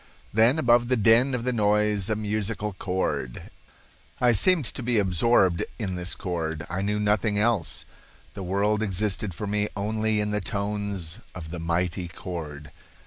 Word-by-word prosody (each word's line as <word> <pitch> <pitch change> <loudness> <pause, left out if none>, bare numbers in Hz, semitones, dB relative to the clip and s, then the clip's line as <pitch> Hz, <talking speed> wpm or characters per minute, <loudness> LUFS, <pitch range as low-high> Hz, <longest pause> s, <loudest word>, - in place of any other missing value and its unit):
Then 115 +7 +5
above 120 -4 +4
the 130 0 +2
din 115 +5 +4
of 120 - -3
the 125 0 0
noise 105 -2 +2
a 110 - +1
musical 105 0 -2
chord. 90 -9 -3 0.7
I 125 -1 +5
seemed 165 - +3
to 120 - -3
be 120 -1 +1
absorbed 95 -1 +3
in 100 -5 -3
this 90 -1 -2
chord. 80 -3 -3
I 95 +2 -1
knew 105 +1 0
nothing 105 0 +1
else. 105 -5 0 0.5
The 100 - -7
world 100 +3 +1
existed 100 -2 -1
for 105 - -4
me 105 +1 0
only 110 +1 0
in 105 0 -1
the 105 0 -1
tones 100 -3 -3 0.2
of 80 -4 -7
the 85 - -5
mighty 90 +2 -1
chord. 75 -4 -7
105 Hz, 160 wpm, -26 LUFS, 90-110 Hz, 0.7 s, Then